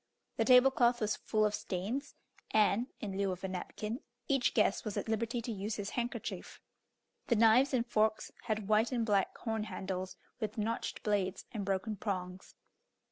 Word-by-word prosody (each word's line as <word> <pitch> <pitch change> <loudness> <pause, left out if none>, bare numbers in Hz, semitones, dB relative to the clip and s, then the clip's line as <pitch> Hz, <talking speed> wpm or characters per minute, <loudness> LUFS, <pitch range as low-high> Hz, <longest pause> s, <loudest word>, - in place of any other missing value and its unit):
The - - +2
table 255 +1 +7
cloth 240 -1 +3
was 215 -1 0
full 215 -1 +1
of 210 - +1
stains, 210 +9 -3 0.3
and, 215 +2 +3
in 200 -3 -4
lieu 195 -1 0
of 185 +1 -6
a - - -1
napkin, 210 +5 -4 0.3
each 270 -3 +2
guest 210 -2 +3
was 215 -3 -4
at - - -2
liberty 230 +2 -1
to 235 - -3
use 210 +1 -3
his 205 -1 -4
handkerchief. 240 0 -4 0.7
The 235 - +3
knives 230 +5 +5
and 245 -3 +1
forks 220 -2 +1
had 215 -2 -1
white 215 +3 +3
and 235 -3 0
black 200 -3 +1
horn 220 -2 -2
handles, 185 -2 -4 0.2
with 215 -1 -3
notched 225 +2 -2
blades, 200 -3 0
and 215 -5 -3
broken 195 +2 -1
prongs. 185 -2 -4
215 Hz, 175 wpm, -33 LUFS, 200-235 Hz, 0.7 s, table